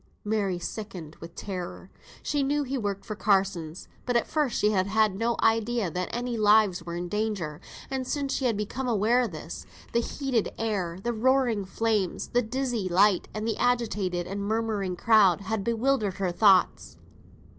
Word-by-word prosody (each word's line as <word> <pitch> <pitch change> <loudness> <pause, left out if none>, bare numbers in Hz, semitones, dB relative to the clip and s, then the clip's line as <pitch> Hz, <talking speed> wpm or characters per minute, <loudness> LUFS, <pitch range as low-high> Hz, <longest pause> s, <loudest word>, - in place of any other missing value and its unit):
Mary 205 -4 0
sickened 175 -4 -7
with 165 0 -11
terror. 185 -1 -6 0.3
She 290 -1 0
knew 290 +2 +1
he 270 0 -3
worked 200 -5 -3
for 215 - -5
Carsons; 190 -5 0 0.2
but 245 - -2
at 235 - +3
first 300 -5 0
she 210 - +3
had 190 -2 +1
had 215 -1 +2
no 230 +3 0
idea 225 -3 +2
any 235 +7 -3
lives 210 -4 +4
were 170 0 -6
in 175 +1 -3
danger; 200 -6 -2 0.3
and 265 -1 -3
since 280 -1 -1
she 265 - -1
had 230 -4 +1
become 230 +5 -3
aware 230 +2 +3
of 235 -5 -1
this, 160 +1 -7 0.3
the 235 - +3
heated 255 -3 -1
air, 195 -7 -2
the 240 - -1
roaring 240 -3 +2
flames, 210 -1 -1
the 245 - +2
dizzy 240 -4 -2
light, 190 +1 +4
and 215 +1 -4
the 225 - -1
agitated 210 -8 0
and 200 +2 -4
murmuring 210 -3 -1
crowd, 200 -3 +4
had 200 +1 -2
bewildered 230 -3 +1
her 190 -2 -1
thoughts. 190 0 +3
215 Hz, 170 wpm, -27 LUFS, 190-235 Hz, 0.3 s, lives